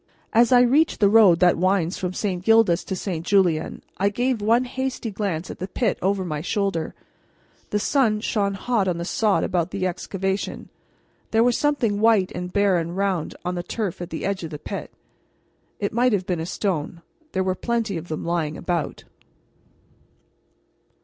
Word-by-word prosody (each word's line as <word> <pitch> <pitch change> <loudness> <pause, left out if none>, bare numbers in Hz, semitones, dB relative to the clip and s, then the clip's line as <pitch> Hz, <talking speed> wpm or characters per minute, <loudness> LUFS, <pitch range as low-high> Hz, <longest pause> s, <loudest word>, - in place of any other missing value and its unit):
As 235 +2 +5
I 245 -1 +7
reached 280 +6 +3
the 200 -2 +4
road 205 -7 +6
that 180 -2 +4
winds 185 -2 +1
from 180 -1 -2
St. 185 -2 -2
Gildas 225 -5 +4
to 190 - -3
St. 180 -4 -4
Julien 180 -4 +1
I 200 +1 +2
gave 245 +2 -1
one 230 +4 +3
hasty 260 -2 -3
glance 190 -5 -3
at - - -10
the 185 - -4
pit 210 +1 -1
over 190 0 0
my 155 -4 -3
shoulder. 195 -2 -2 0.7
The 210 - 0
sun 220 -1 +2
shone 200 -3 0
hot 210 -1 0
on 175 -2 0
the 170 - -4
sod 210 +2 +1
about 180 -2 0
the 185 0 -2
excavation. 190 +2 -3 0.6
There 225 0 +3
was 245 -1 +3
something 245 -9 +1
white 220 -4 +3
and 180 +1 -5
bare 200 -1 +3
and 170 +2 -4
round 195 -5 -1
on 180 - -1
the 175 - -3
turf 195 -1 -4
at 175 - -5
the 160 - -4
edge 195 -2 -2
of 165 - -4
the 150 - -6
pit. - - -6 0.9
It 200 - -2
might 245 +1 +3
have 190 -3 0
been 180 -3 -1
a 165 - -4
stone; 170 -4 -3 0.3
there 190 - +1
were 185 0 0
plenty 230 0 -2
of 165 +1 -5
them 155 - -4
lying 165 -3 -1
about. 170 -4 -3
195 Hz, 185 wpm, -23 LUFS, 175-220 Hz, 0.9 s, I